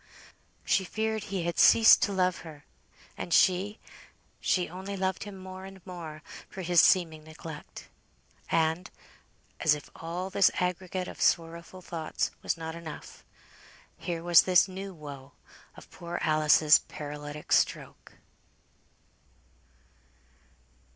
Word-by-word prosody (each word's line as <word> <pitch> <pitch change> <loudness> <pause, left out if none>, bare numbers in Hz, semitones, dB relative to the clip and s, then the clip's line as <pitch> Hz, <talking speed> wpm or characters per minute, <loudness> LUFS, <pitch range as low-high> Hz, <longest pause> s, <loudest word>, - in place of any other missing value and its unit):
She 195 - +2
feared 220 +2 -2
he 195 -4 -3
had 170 0 -2
ceased 225 0 +7
to 205 - +1
love 185 -2 +1
her; 150 -3 -12 0.5
and - - -5
she 190 +5 +3 0.6
she 180 -2 +1
only 190 +3 -7
loved 190 +1 -2
him 205 -2 -9
more 185 0 -9
and 195 0 -11
more 165 -4 -8 0.3
for 190 - -7
his 175 -1 +5
seeming 160 -4 +3
neglect. 155 0 -10 0.6
And, 165 +3 0 0.7
as 155 -2 +4
if 150 - -11
all 175 +3 -5
this 195 0 +5
aggregate 180 0 -2
of - - -9
sorrowful 170 +2 -1
thoughts 165 -2 -3
was - - -1
not 160 0 -6
enough, 165 -2 -10 0.7
here 170 0 -5
was 175 -1 +7
this 185 0 +4
new 195 +1 -7
woe, 140 -5 -11 0.4
of - - -14
poor 175 0 -6
Alice's 155 0 +5
paralytic 145 0 -8
stroke. - - 0
175 Hz, 125 wpm, -28 LUFS, 160-190 Hz, 0.7 s, ceased